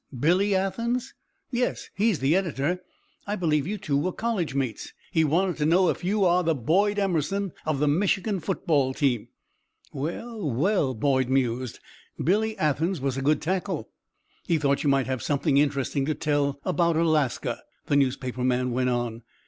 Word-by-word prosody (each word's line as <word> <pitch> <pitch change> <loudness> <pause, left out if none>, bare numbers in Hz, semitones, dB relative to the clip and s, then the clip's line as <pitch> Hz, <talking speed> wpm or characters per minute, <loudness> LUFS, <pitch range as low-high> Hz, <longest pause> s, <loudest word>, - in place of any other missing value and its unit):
Billy 185 +8 +3
Athens?" 235 +7 -1 0.4
"Yes! 245 0 -2
He 215 +4 +2
is 200 - +1
the 140 +4 +2
editor. 175 -1 -1 0.5
I 205 - -1
believe 155 -6 +1
you 210 +2 -2
two 175 -8 -2
were 160 +6 +1
college 190 -10 -2
mates. 130 -5 -3 0.2
He 160 -3 +3
wanted 175 +4 +1
to 150 - 0
know 180 +2 +4
if - - -2
you 200 +2 +2
are 180 0 +4
the 165 -2 +1
Boyd 195 - +2
Emerson 195 0 0
of 155 -2 +1
the 150 +2 +1
Michigan 190 +5 +1
football 155 -7 0
team." 125 -7 0 0.7
"Well, 175 - -4
well!" 145 - +1
Boyd 130 +1 +1
mused. 130 -2 0 0.4
"Billy 215 +6 +1
Athens 160 +4 0
was 135 -1 -1
a 135 - -3
good 150 +2 +1
tackle." 180 - -2 0.6
"He 170 - +3
thought 140 -2 +1
you 145 - +2
might 135 -2 +3
have 130 -2 -3
something 145 +1 +1
interesting 140 -1 0
to 155 - 0
tell 145 -2 0
about 170 -3 +2
Alaska," 155 -5 +1 0.2
the 145 - +1
newspaper 130 -2 0
man 125 0 +1
went 125 +1 +1
on. 120 -2 -2
155 Hz, 170 wpm, -26 LUFS, 135-190 Hz, 0.7 s, know